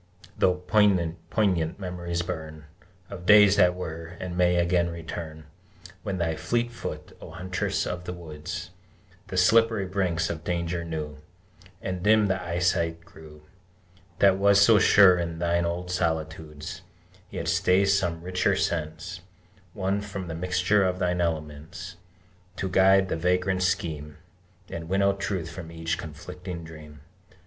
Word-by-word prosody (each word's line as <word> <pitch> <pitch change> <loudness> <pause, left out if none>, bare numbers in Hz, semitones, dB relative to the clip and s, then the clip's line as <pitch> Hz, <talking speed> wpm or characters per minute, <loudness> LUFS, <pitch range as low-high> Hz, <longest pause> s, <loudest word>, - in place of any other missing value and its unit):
Though 90 - +3
poignant 90 -2 +1
memories 85 -2 -3
burn 80 -3 -6 0.5
Of 90 0 -8
days 105 -1 +7
that 90 -2 +5
were, 85 -1 -7
and 90 -1 -5
may 90 0 +3
again 85 0 +2
return, 80 -1 -7 0.6
When 95 - -3
thy 80 -2 -1
fleet 120 +7 -1
foot, 120 - -7
O - - -9
Huntress 90 +3 -2
of 90 0 -4
the - - -4
Woods, 80 -4 -7 0.6
The 95 - -5
slippery 110 +2 +4
brinks 90 -3 -1
of 80 -2 -6
danger 85 0 -2
knew, 75 -3 -5 0.6
And 90 -1 -3
dim 105 +1 +4
the 95 -1 0
eyesight 85 -1 0
grew 75 -1 -14 0.7
That 95 -1 +4
was 100 0 +5
so 105 +1 +6
sure 95 -2 +6
in 85 -1 -3
thine 85 0 +1
old 90 +1 -3
solitudes, 80 -1 -3 0.5
Yet 80 - -5
stays 95 +3 +3
some 85 -4 -1
richer 90 +1 +1
sense 85 +2 -3 0.5
Won 100 0 -1
from 100 -3 -6
the - - -4
mixture 90 +4 +1
of 90 -1 0
thine 90 -1 0
elements, 80 +3 -4 0.6
To 95 - -3
guide 95 +1 +5
the - - -1
vagrant 90 +2 +1
scheme, 75 -4 -2 0.5
And 80 0 -7
winnow 100 +1 +3
truth 95 -4 -3
from 85 -1 -8
each 80 0 -3
conflicting 85 +3 -8
dream! 75 -3 -12
90 Hz, 140 wpm, -26 LUFS, 80-95 Hz, 0.7 s, days